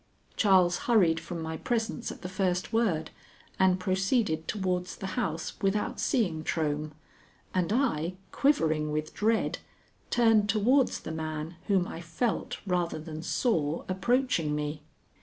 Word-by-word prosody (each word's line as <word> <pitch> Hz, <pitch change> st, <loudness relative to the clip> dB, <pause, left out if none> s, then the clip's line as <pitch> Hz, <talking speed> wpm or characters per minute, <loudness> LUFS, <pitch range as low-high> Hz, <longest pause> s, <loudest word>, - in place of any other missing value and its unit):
Charles 185 Hz, -4 st, +4 dB
hurried 175 Hz, -9 st, +4 dB
from 165 Hz, 0 st, -6 dB
my 160 Hz, 0 st, -4 dB
presence 230 Hz, +3 st, -2 dB
at -, -, -11 dB
the -, -, -3 dB
first 185 Hz, 0 st, -1 dB
word, 190 Hz, -9 st, +1 dB, 0.5 s
and 185 Hz, -1 st, +4 dB
proceeded 185 Hz, -2 st, 0 dB
towards 185 Hz, -3 st, -1 dB
the 195 Hz, -, -7 dB
house 160 Hz, 0 st, -2 dB
without 200 Hz, +1 st, 0 dB
seeing 175 Hz, -, +1 dB
Trohm, 150 Hz, -1 st, -1 dB, 0.6 s
and 185 Hz, 0 st, 0 dB
I, 185 Hz, -, +1 dB, 0.2 s
quivering 155 Hz, -, +2 dB
with 155 Hz, 0 st, -2 dB
dread, 220 Hz, +1 st, +1 dB, 0.5 s
turned 225 Hz, -3 st, +4 dB
towards 240 Hz, +6 st, +3 dB
the -, -, -6 dB
man 160 Hz, +1 st, -4 dB
whom 190 Hz, -3 st, +2 dB
I 165 Hz, -, -7 dB
felt, 170 Hz, +8 st, -2 dB
rather 175 Hz, -3 st, 0 dB
than 155 Hz, 0 st, -7 dB
saw, 165 Hz, -, 0 dB
approaching 190 Hz, -, +1 dB
me. 150 Hz, 0 st, -3 dB
180 Hz, 135 wpm, -29 LUFS, 160-215 Hz, 0.6 s, Charles